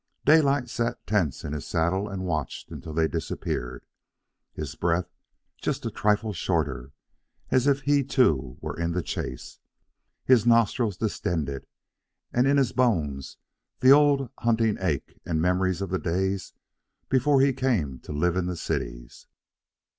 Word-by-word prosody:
Daylight 140 -4 +4
sat 115 -1 -3
tense 90 - 0
in 75 - -4
his 75 - -5
saddle 90 +5 0
and 95 -1 -4
watched 80 -5 -3
until 80 - -7
they 80 -1 +3
disappeared, 65 -6 -4 0.7
his 75 -2 -6
breath 85 +1 -1 0.5
just - - -2
a - - -2
trifle 105 0 +1
shorter, 75 -7 -2 0.6
as 130 +1 +3
if 140 0 +3
he, 145 0 +2
too, 75 - +1
were - - -4
in 85 0 -2
the 90 -1 -1
chase, 65 - -6 0.7
his 125 -4 +5
nostrils 115 -3 +2
distended, 80 -10 -2 0.7
and 125 +2 +3
in 140 +1 +4
his 130 -4 +2
bones 80 - 0 0.4
the 130 - +7
old 140 -3 +5
hunting 115 -2 +2
ache - - -2
and 80 -2 -1
memories 90 +2 +1
of 95 - -5
the 95 - 0
days 95 +2 -2 0.5
before 135 +2 +3
he 135 0 +4
came 105 - -1
to - - -10
live 85 +4 +1
in 90 -1 -1
cities. - - -5
95 Hz, 145 wpm, -26 LUFS, 80-125 Hz, 0.7 s, the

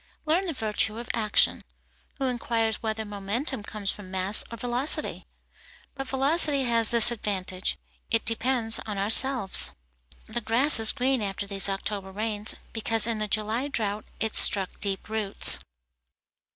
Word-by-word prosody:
Learn 340 +5 0
the 330 - -3
virtue 220 -2 -1
of 235 0 -5
action. 215 -2 +1 0.5
Who 270 - -2
inquires 230 -3 -2
whether 220 0 -3
momentum 210 +6 -3
comes 205 -1 -2
from 200 -3 -10
mass 190 +2 +1
or 230 - -7
velocity? 245 +5 -2 0.7
But 270 -1 -7
velocity 280 +1 +1
has 230 -3 +2
this 235 0 +8
advantage; 190 -4 -3 0.3
it 225 -1 0
depends 230 -1 0
on 210 -2 -4
ourselves. 220 +1 +4 0.5
The 240 +2 -5
grass 240 +5 +3
is 220 -1 +4
green 260 -1 0
after 200 0 -4
these 200 0 -1
October 195 0 -4
rains, 210 +1 -2 0.2
because 225 -1 +2
in 230 -2 -1
the 215 - -2
July 215 +6 -2
drought 210 -6 -4
it 220 -1 -2
struck 195 -2 +3
deep 195 -2 -2
roots. 215 -2 +3
220 Hz, 145 wpm, -25 LUFS, 205-245 Hz, 0.7 s, this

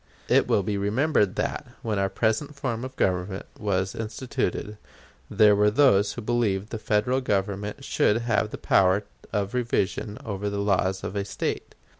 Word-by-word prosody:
It - - +4
will 100 - +2
be 100 +1 -1
remembered 105 0 +1
that, - - -2 0.2
when 110 -3 -1
our 95 0 +1
present 110 +8 0
form 125 -4 -3
of 130 0 -7
government 95 -1 -1
was 95 -2 0
instituted, 110 -2 -3 0.5
there 105 -1 +5
were 105 +1 +4
those 105 -4 +4
who - - -7
believed 105 -4 0
the 110 - -4
Federal 110 +5 +1
Government 100 -2 -2
should 105 - +2
have 110 -2 +1
the - - -6
power 95 +2 +3 0.3
of 100 +1 -1
revision 110 -3 -1
over 100 -1 -3
the 100 - -3
laws 95 -2 +1
of 100 - -5
a 100 - 0
State. 100 - -4
105 Hz, 165 wpm, -26 LUFS, 100-115 Hz, 0.5 s, there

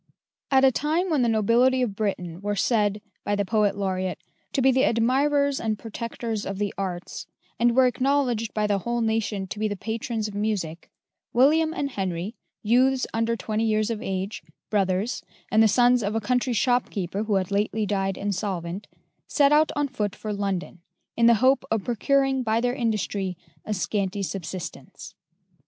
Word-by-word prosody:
At 270 -1 +5
a 265 - +6
time 320 +8 0
when 295 -4 +2
the 240 - +2
nobility 235 +4 +3
of 210 -5 -2
Britain 180 -5 -3
were 205 0 -1
said, 210 -1 +1 0.2
by 205 - 0
the 205 0 0
poet 205 0 +1
laureate, 185 -2 -2 0.4
to - - +1
be 265 0 +5
the 260 0 +2
admirers 275 +4 +2
and 220 -1 -1
protectors 225 0 -5
of 195 - -4
the 205 -1 -2
arts, 185 -3 -5 0.3
and 235 0 +3
were 260 0 +6
acknowledged 250 -2 +1
by 215 -1 0
the 205 -1 +1
whole 235 +4 -2
nation 220 -3 -1
to 200 +2 -7
be 215 - +1
the 205 - -3
patrons 225 +1 -3
of 210 - -8
music 200 -6 -3 0.4
William 310 +6 +4
and 285 -4 -3
Henry, 190 -1 -3 0.3
youths 255 +4 +3
under 230 +1 +1
twenty 220 -1 -2
years 215 0 +1
of 225 -1 -4
age, 195 -1 -3 0.3
brothers, 195 +2 0 0.3
and 220 - +5
the 220 - +7
sons 245 +3 +4
of 205 +1 -2
a - - +2
country 250 +3 0
shopkeeper 215 -5 0
who 210 -2 +1
had 190 0 0
lately 210 +2 0
died 195 -1 -1
insolvent, 195 -2 -3 0.4
set 285 -1 +3
out 305 +1 +4
on 290 -1 +1
foot 210 -7 -3
for 215 -1 -5
London, 195 -3 -3 0.4
in 235 0 +4
the 235 - +7
hope 265 +1 +4
of 220 -3 0
procuring 270 +3 +1
by 225 -2 +1
their 245 +1 0
industry 210 -6 -2 0.3
a - - -5
scanty 200 +1 -1
subsistence. 185 -1 -6
220 Hz, 175 wpm, -25 LUFS, 200-245 Hz, 0.4 s, the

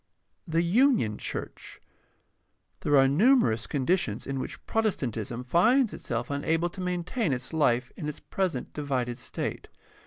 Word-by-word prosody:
The 165 +1 +1
union 195 - +3
church. - - -6 0.5
— - - -47
There 145 -1 +3
are 135 0 +6
numerous 145 - +3
conditions 135 - 0
in 135 -1 -3
which - - -7
Protestantism 135 - -1
finds 225 - +3
itself 120 +3 -4
unable 165 +4 0
to 185 - -7
maintain 180 - -1
its 130 +3 -3
life 125 -5 +2
in 150 - -4
its 150 - -7
present 180 -10 -3
divided 130 -5 -2
state. - - -4
150 Hz, 135 wpm, -28 LUFS, 125-185 Hz, 0.5 s, are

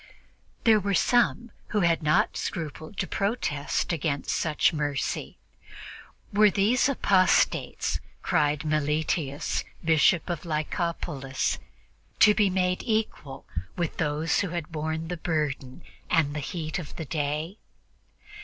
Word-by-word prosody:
There 220 -2 +6
were 200 0 0
some 240 +3 +2 0.2
who 210 - 0
had 170 -2 +3
not 155 0 +2
scrupled 160 +2 -5
to - - 0
protest 190 -8 -1
against 145 -3 -1
such 155 0 +2
mercy. 145 -3 -2 1.0
"Were 210 +1 +6
these 215 +7 +3
apostates," 195 -8 +2 0.2
cried 150 -3 +1
Meletius, 150 -1 0 0.2
Bishop 160 +2 +4
of 175 -4 -3
Lykopolis, 150 -4 -2 0.6
"to 210 - +7
be 205 -2 +3
made 180 -1 0
equal 215 - -2 0.3
to 170 -2 +1
those 155 0 +1
who 200 - 0
had 170 -1 -4
borne 160 +1 -3
the 180 +1 -4
burden 150 -3 -2 0.3
and 150 -3 +2
the - - -1
heat 155 +3 -4
of 160 - -8
the 160 - -5
day?" 155 +6 -2
160 Hz, 120 wpm, -27 LUFS, 150-185 Hz, 1.0 s, to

